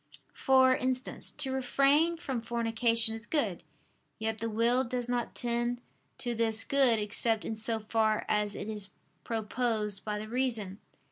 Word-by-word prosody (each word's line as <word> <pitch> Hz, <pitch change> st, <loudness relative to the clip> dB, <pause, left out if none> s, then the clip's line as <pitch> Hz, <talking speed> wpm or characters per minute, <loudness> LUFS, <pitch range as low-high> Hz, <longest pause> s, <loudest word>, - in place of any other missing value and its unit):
For 260 Hz, -1 st, +4 dB
instance, 255 Hz, +1 st, +1 dB
to 265 Hz, -, -2 dB
refrain 275 Hz, +5 st, +2 dB
from 265 Hz, -7 st, -4 dB
fornication 230 Hz, 0 st, +2 dB
is 225 Hz, +1 st, -6 dB
good: 220 Hz, -, -1 dB, 0.6 s
yet 220 Hz, 0 st, -2 dB
the 230 Hz, +1 st, -3 dB
will 235 Hz, +4 st, +2 dB
does 245 Hz, -1 st, -3 dB
not 245 Hz, -1 st, -2 dB
tend 240 Hz, 0 st, -1 dB, 0.4 s
to 240 Hz, -, -3 dB
this 225 Hz, -1 st, +1 dB
good 265 Hz, -4 st, +3 dB
except 215 Hz, +1 st, 0 dB
in 220 Hz, -, -3 dB
so 220 Hz, +1 st, -2 dB
far 215 Hz, 0 st, 0 dB
as 210 Hz, -1 st, 0 dB
it 200 Hz, -, -6 dB
is 210 Hz, -2 st, +1 dB, 0.3 s
proposed 220 Hz, -2 st, -2 dB
by 210 Hz, -1 st, -3 dB
the 215 Hz, +1 st, -6 dB
reason. 225 Hz, -5 st, 0 dB
230 Hz, 150 wpm, -30 LUFS, 220-250 Hz, 0.6 s, For